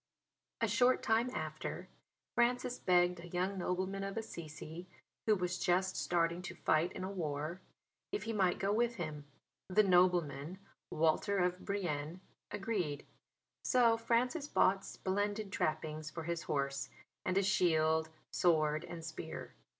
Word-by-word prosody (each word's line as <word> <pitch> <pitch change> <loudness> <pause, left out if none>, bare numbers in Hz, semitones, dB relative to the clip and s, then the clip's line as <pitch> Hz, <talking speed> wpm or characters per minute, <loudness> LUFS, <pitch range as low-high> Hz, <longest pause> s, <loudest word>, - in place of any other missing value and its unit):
A - - +3
short 255 0 +3
time 225 +3 +3
after - - -4 0.5
Francis 245 +1 +1
begged 180 -1 +3
a 170 - -9
young 185 +3 -1
nobleman 185 +2 -1
of 195 +2 -4
Assisi, 165 -4 -7 0.4
who 215 - +6
was 180 -2 -2
just 185 +1 +2
starting 170 0 +1
to 180 - -7
fight 160 +3 +2
in 185 - -5
a 190 - -3
war, 155 -1 -3 0.5
if 410 - -2
he 225 - -3
might 190 -4 +2
go 200 +1 +1
with 235 +2 +2
him. 155 -6 -5 0.4
The 200 +3 +4
nobleman 175 -4 +3 0.3
Walter 165 +6 +2
of 180 0 +1
Brienne, 175 -5 -2 0.3
agreed: 195 -8 -2 0.6
so 235 -2 +5
Francis 250 +7 +1
bought 195 -8 +3
splendid 205 +1 -2
trappings 155 -1 -2
for 165 +1 -6
his 170 +1 -2
horse, 140 -1 -1 0.3
and 185 - 0
a 195 - +4
shield, 160 -4 +3 0.2
sword 155 -2 +3
and 170 -2 -7
spear. 160 0 -6
180 Hz, 140 wpm, -35 LUFS, 160-200 Hz, 0.6 s, who